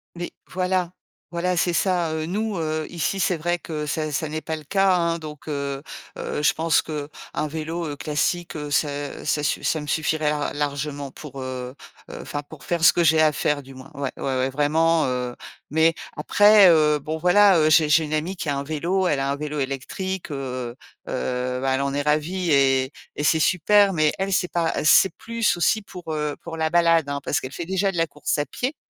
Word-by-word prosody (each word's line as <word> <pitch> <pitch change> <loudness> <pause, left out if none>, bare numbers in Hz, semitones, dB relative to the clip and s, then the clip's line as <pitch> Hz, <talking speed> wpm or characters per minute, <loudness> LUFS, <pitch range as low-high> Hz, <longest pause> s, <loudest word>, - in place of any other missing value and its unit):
Mais 175 0 -5 0.2
voilà. 185 -1 0 0.4
Voilà, 175 +1 -1
c'est 175 +1 +2
ça, 175 -3 +1
heu. 155 0 -2
Nous, 210 +4 -2
heu, 155 -1 -2
ici, 175 +3 -2
c'est 180 -1 +2
vrai 175 +2 -1
que 150 -2 -5
ça 155 0 -2
ça 155 +1 -1
n'est 155 +1 -3
pas 160 0 -4
le 155 - -9
cas, 195 +3 +3
hein 170 -1 0
donc, 155 -1 -9
heu 140 -1 -3 0.3
heu, 150 - -3
je - - +4
pense 165 0 +2
qu'un 150 -2 -5 0.4
vélo, 160 +2 -4
heu, 145 -1 -5
classique, 160 +4 -1
heu, 150 -1 -5
ça 145 -1 -2
ça 150 - 0
suff - - -1
ça 155 - 0
me 150 - -8
suffirait 155 0 0
ar 150 -1 -2
largement 145 -1 -3
pour, 140 -2 -9
heu 130 0 -5 0.3
heu, - - -8
enfin 145 0 -5
pour 150 0 -13
faire 170 -2 -2
ce - - +8
que 175 - +2
j'ai 160 0 +4
à 155 -1 +4
faire 145 0 0
du 135 0 -13
moins. 130 +1 -12
Ouais. 140 -1 -3
Ouais, - - -8
ouais, 130 -1 0
vraiment, 155 +4 +2
heu, 125 -1 -2 0.3
mais, 160 +2 +3 0.2
après, 205 +5 +6
heu, 150 -2 +4
bon, 155 +2 -4
voilà, 180 +2 +5
heu, 155 0 +4
j'ai 155 0 +5
j'ai 155 +1 +4
une 150 - -5
amie 170 +5 -2
qui - - -5
a 145 - 0
un 140 - -3
vélo. 170 +6 -1
Elle 140 - +1
a 135 0 -1
un 140 - 0
vélo 150 0 -4
électrique, 155 +7 -4
heu 130 -3 -4 0.3
heu, 125 0 -2
bah, 135 0 +1
elle 135 - -1
en 140 0 -1
est 145 - -1
ravie 155 +4 0
et 135 0 +3 0.2
et 145 - -2
c'est 160 +1 +3
super 200 +4 +4
mais 155 -3 +2
elle 195 +1 -2
c'est 180 -1 +1
pas 170 -2 0
c'est 180 +3 +6
plus 230 -5 0
aussi 215 +5 +2
pour, 180 -5 -8
heu, 150 -1 -2
pour 165 -1 -7
la 160 0 0
balade, 165 -3 +3
hein, 140 0 -2
parce 155 +3 -1
qu'elle 130 - -6
fait 170 - -5
déjà 190 +2 0
de 175 - -6
la 165 0 +2
course 150 0 -2
à 145 - 0
pieds 255 - -3
155 Hz, 220 wpm, -23 LUFS, 145-175 Hz, 0.4 s, ce